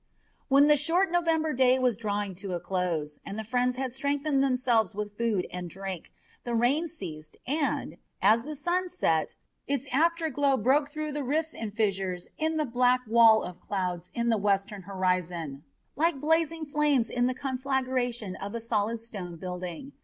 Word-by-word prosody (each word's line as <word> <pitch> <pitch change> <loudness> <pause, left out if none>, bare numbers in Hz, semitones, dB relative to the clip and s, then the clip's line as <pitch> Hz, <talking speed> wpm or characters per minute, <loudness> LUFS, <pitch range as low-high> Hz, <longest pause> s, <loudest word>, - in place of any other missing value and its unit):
When 275 +1 +6
the 300 0 +5
short 335 +6 +2
November 325 -3 +1
day 255 0 +4
was 250 -3 +2
drawing 205 -2 -2
to 190 -1 -5
a - - -2
close, 165 -6 -2
and 200 - -6
the 220 - -3
friends 250 +3 0
had 260 -1 -3
strengthened 280 +1 0
themselves 250 -6 +2
with 210 0 -4
food 215 -5 0
and 180 -1 -5
drink, 190 -1 -6 0.3
the 240 -1 -2
rain 270 +9 +2
ceased 155 - -7
and, 290 +3 -1 0.2
as 215 +4 +5
the 305 +3 -6
sun 355 +5 -1
set, 165 - 0 0.3
its 275 -1 -1
after 330 +2 +2
glow 275 0 +2
broke 275 +6 +2
through 305 0 -4
the 295 0 -3
rifts 310 +5 0
and 215 -2 -6
fissures 190 -4 -1
in 320 0 0
the 305 - +1
black 250 0 +3
wall 225 -1 +6
of 180 0 -7
clouds 180 -3 -3
in 235 0 0
the 225 - +3
western 200 0 0
horizon 180 -6 -2 0.3
like 320 0 +1
blazing 320 +1 +1
flames 290 -5 +2
in 245 +1 +1
the 255 - -1
conflagration 255 -5 -1
of 200 +3 -6
a - - -2
solid 225 0 -1
stone 195 -7 -7
building. 180 - -6
240 Hz, 175 wpm, -28 LUFS, 195-285 Hz, 0.3 s, When